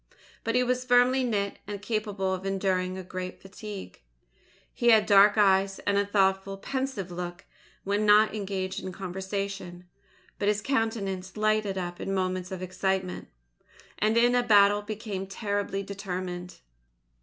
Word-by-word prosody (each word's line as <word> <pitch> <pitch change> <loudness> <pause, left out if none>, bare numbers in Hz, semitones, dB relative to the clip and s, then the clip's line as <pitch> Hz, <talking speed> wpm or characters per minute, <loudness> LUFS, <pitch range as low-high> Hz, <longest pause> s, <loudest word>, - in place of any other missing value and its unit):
But 230 - -1
he 250 - +4
was 250 0 0
firmly 250 +1 +4
knit, 205 -5 -1
and 205 -1 -5
capable 205 -3 -2
of 185 0 -4
enduring 190 -1 -1
great 185 0 -6
fatigue. 195 - -9 0.7
He 240 - -1
had 220 -3 +6
dark 205 +1 +6
eyes 195 -1 +4
and 205 - -1
a 200 0 +2
thoughtful, 195 -1 +1
pensive 260 -4 -3
look 175 +1 -6 0.4
when 205 +2 0
not 210 +1 +5
engaged 195 -3 -3
in 185 - -6
conversation; 190 -1 -5 0.5
but 205 - 0
his 210 0 +1
countenance 210 -7 -2
lighted 215 -2 +1
up 175 -1 -4
in 195 - -2
moments 185 -1 -2
of 185 -1 -5
excitement, 185 0 -2 0.7
and 215 +2 +2
in 240 +1 +5 0.2
battle 205 -1 +6
became 205 -2 -5
terribly 200 0 -2
determined. 185 -3 -6
195 Hz, 140 wpm, -27 LUFS, 190-215 Hz, 0.7 s, had